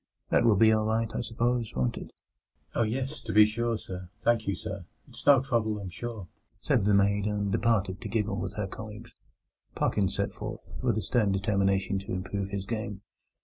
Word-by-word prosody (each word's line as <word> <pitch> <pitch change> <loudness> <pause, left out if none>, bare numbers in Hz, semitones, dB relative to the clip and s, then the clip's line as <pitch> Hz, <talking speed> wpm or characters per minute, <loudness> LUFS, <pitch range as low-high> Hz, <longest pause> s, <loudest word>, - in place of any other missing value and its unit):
That - - +4
will 115 -3 +6
be 110 +2 +6
all 110 0 +2
right, 110 +1 +1
I - - -1
suppose, 115 +1 -1
won't 65 -1 0
it?" - - -8 0.6
"Oh - - +1
yes, 130 +6 -1
to - - -5
be 105 0 +8
sure, 115 +1 -1
sir. 90 -3 -8
Thank 115 -3 +2
you, 100 - +1
sir. 100 -1 -6 0.2
It's - - -13
no 140 -3 +8
trouble, 115 -5 0
I'm 100 -2 -6
sure," 105 0 -6 0.3
said - - +1
the 105 -1 +4
maid, 100 0 +3
and 100 -1 -1
departed 95 -4 +1
to - - -5
giggle 105 -3 0
with 90 0 -4
her 105 - -1
colleagues. 110 +3 -9 0.6
Parkins 95 -2 +1
set 100 - -1
forth, 110 +1 -7
with 120 -4 +1
a 110 - -1
stern 110 -5 +2
determination 100 -1 +1
to 95 - -6
improve 95 +1 -3
his 100 -1 -3
game. 110 -2 -4
105 Hz, 195 wpm, -29 LUFS, 100-115 Hz, 0.6 s, be